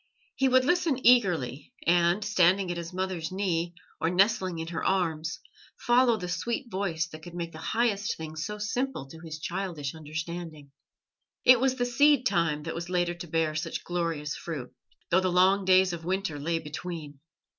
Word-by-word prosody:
He 270 +1 +2
would 255 0 +4
listen 325 -3 +2
eagerly, 175 - +3
and, 175 +4 +3
standing 190 -2 +3
at 175 - -4
his 170 -1 -5
mother's 185 -3 -3
knee, 175 -3 -1 0.2
or 165 - +1
nestling 185 -1 +2
in 165 0 -4
her 165 -2 -4
arms, 165 -4 0 0.4
follow 240 -1 +3
the 180 -3 -5
sweet 235 +7 -3
voice 175 -4 -1
that 155 -1 -10
could 175 +2 -10
make 170 -1 -4
the 155 - -10
highest 215 +1 0
things 155 0 -5
so 210 +3 -4
simple 245 - -2
to 160 +4 -12
his 160 -2 -7
childish 170 -4 -4
understanding. 160 -1 -6 0.7
It 250 -1 +8
was 260 +1 +2
the 245 -1 0
seed 280 +2 +4
time 165 -8 +1
that 165 - -4
was 170 +1 -5
later 175 -1 +1
to 175 0 -8
bear 160 -1 0
such 155 +2 -3
glorious 165 -4 -2
fruit, 145 -7 -6 0.4
though 185 +2 +5
the 185 -1 0
long 190 +2 +4
days 185 -1 +5
of 165 -1 -6
winter 185 -3 -2
lay 165 +3 0
between. 155 -2 -7
175 Hz, 175 wpm, -28 LUFS, 160-200 Hz, 0.7 s, It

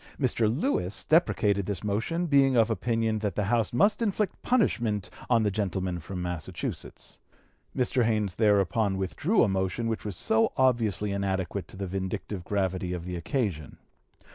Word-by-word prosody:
Mr. 120 -5 +2
Lewis 120 - -1
deprecated 105 - +2
this 100 -1 -3
motion, 115 - -1
being 140 -4 +4
of 115 0 +4
opinion 115 -1 0
that 105 -2 -2
the 105 - 0
House 115 +1 +1
must 200 - +3
inflict 210 -2 -1
punishment 115 - +1 0.2
on 115 -2 +4
the 105 - +1
gentleman 95 -3 -2
from 90 +2 -6
Massachusetts. 90 -3 -6 0.6
Mr. 125 0 +2
Haynes 105 -4 0
thereupon 105 -1 +2
withdrew 145 - +1
a - - +3
motion 95 +3 -1
which 115 -1 -2
was 100 -4 -5
so 110 +1 +2
obviously 115 -6 +2
inadequate 95 -1 -2
to - - -12
the 100 - -3
vindictive 95 0 -4
gravity 95 -2 -1
of 90 -1 -5
the 90 0 -4
occasion. 85 - -3
105 Hz, 155 wpm, -28 LUFS, 95-120 Hz, 0.6 s, being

